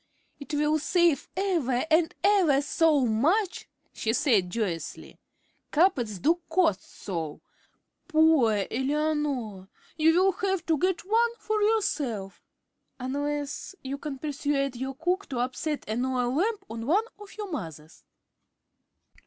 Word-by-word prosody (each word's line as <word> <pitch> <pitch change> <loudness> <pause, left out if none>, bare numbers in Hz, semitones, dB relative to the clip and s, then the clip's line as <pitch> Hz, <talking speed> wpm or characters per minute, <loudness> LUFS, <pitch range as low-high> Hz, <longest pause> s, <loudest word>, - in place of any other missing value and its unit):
"It 295 +1 -5
will 300 +1 +2
save 340 0 +2
ever 325 -11 0
and 320 0 +3
ever 365 -9 +4
so 300 -2 +3
much," 335 - +1 0.3
she 220 - -1
said, 235 - +2
joyously. 180 -5 -4 0.5
"Carpets 270 - +2
do 330 - +1
cost 320 - +2 0.2
so. 165 -6 -4 0.7
Poor 310 - +4
Eleanor, 270 -7 -1 0.3
you 320 +1 +4
will 385 +1 +4
have 380 -3 -2
to 320 -3 +1
get 370 +1 +1
one 465 +3 +2
for 430 -2 -1
yourself, 285 - 0 0.6
unless 290 +6 -3
you 275 +1 -4
can 285 -2 -5
persuade 280 -2 -1
your 265 +2 -4
cook 360 +7 -1
to 260 - -4
upset 255 +5 -2
an 220 +3 -1
oil 250 -1 0
lamp 395 +6 0
on 225 +1 -6
one 385 +9 +3 0.2
of 415 0 -13
your 415 -3 -5
mother's." 160 - -7
295 Hz, 130 wpm, -27 LUFS, 245-345 Hz, 0.7 s, ever